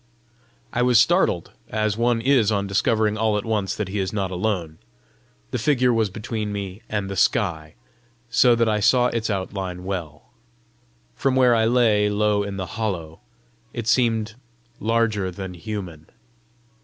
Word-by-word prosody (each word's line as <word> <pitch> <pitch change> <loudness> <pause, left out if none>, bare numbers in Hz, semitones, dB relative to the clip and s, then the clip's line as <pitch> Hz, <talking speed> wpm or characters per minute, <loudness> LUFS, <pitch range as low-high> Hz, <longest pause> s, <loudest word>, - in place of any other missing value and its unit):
I 125 - 0
was 125 -2 +5
startled, - - +2 0.2
as 110 -1 0
one 120 0 +1
is 125 -4 +3
on 100 -1 0
discovering 105 +2 +1
all 110 -1 +2
at 105 - -4
once 105 -4 -1
that 105 - -3
he 100 +2 -3
is 95 -1 -1
not 100 -3 -2
alone. 90 -5 -2 0.7
The - - -2
figure 125 -4 +2
was 110 -2 +1
between 110 +1 -4
me 100 0 -5
and 105 -2 -2
the 95 - -5
sky, 80 -5 0 0.5
so 120 +1 +4
that 115 0 +2
I 105 -1 +1
saw 125 +4 +4
its 115 -1 -2
outline 95 -2 -4
well. 85 -5 -6 0.8
From 135 -1 0
where 125 -2 +5
I 110 -1 +3
lay 110 -3 +3
low 105 0 +1
in 100 -1 -4
the 95 - -3 0.2
hollow, 85 -7 -3 0.5
it 120 -2 -4
seemed 115 -2 +1 0.5
larger 110 -4 0
than 95 0 -7
human. 90 -4 -7
105 Hz, 155 wpm, -23 LUFS, 95-115 Hz, 0.8 s, was